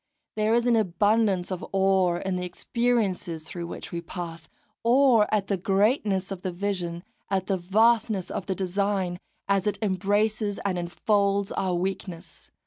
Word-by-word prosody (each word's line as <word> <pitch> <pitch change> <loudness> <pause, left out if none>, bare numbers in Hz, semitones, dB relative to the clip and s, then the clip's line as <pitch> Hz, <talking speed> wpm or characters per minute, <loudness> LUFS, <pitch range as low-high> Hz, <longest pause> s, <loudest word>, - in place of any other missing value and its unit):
There 215 +1 +2
is 240 0 +2
an 240 -1 +4
abundance 205 -1 +2
of 185 - -4
awe 190 -2 +3
in 185 +2 -2
the 180 - -2
experiences 190 -4 -1
through 170 +1 -6
which - - -8
we 170 - -3
pass, 165 -2 -7 0.3
awe 240 -2 +5
at 210 -2 +1
the 195 - -1
greatness 195 0 +1
of 190 -2 -5
the 185 - -3
vision, 175 -2 -3 0.3
at 190 -1 0
the 195 - 0
vastness 215 +1 +2
of - - -4
the 190 - -1
design, 190 -1 -1 0.3
as 195 0 +1
it 210 - 0
embraces 205 +1 0
and 185 -3 0
enfolds 200 +2 +1
our 185 -2 -1
weakness. 175 -3 -5
195 Hz, 155 wpm, -26 LUFS, 180-210 Hz, 0.3 s, awe